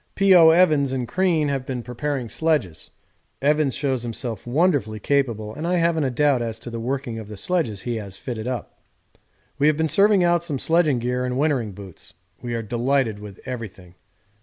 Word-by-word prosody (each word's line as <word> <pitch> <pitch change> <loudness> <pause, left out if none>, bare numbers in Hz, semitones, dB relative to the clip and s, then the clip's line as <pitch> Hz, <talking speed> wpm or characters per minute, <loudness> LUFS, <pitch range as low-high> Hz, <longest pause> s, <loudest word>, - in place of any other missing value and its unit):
P.O. 185 -4 +7
Evans 155 -5 +4
and 130 -2 -2
Crean 170 -4 +1
have 135 -2 -2
been 130 -2 -5
preparing 125 +1 -3
sledges; 135 - -1 0.5
Evans 150 -1 +2
shows 135 -4 -1
himself 120 0 -5
wonderfully 130 - +1
capable, 115 -5 -1
and 160 +7 -5
I 180 - +1
haven't 165 -3 +1
a - - +1
doubt 135 0 +2
as 115 -1 -3
to 120 - -8
the 115 - -5
working 120 -1 -3
of 110 - -8
the 105 -1 -9
sledges 115 - -1
he 120 -2 -2
has 100 -3 -8
fitted 120 -3 -5
up. 125 -3 -5 0.8
We 145 - +4
have 155 -1 +3
been 160 0 +1
serving 195 +5 +4
out 175 -1 +2
some 155 -5 -3
sledging 160 -1 +2
gear 125 +1 -1
and 125 0 -2
wintering 135 -8 0
boots. 95 -2 -12 0.3
We 120 -1 -4
are 115 - -3
delighted 120 0 0
with 105 -2 -10
everything. 110 -8 -7
130 Hz, 185 wpm, -23 LUFS, 115-155 Hz, 0.8 s, P.O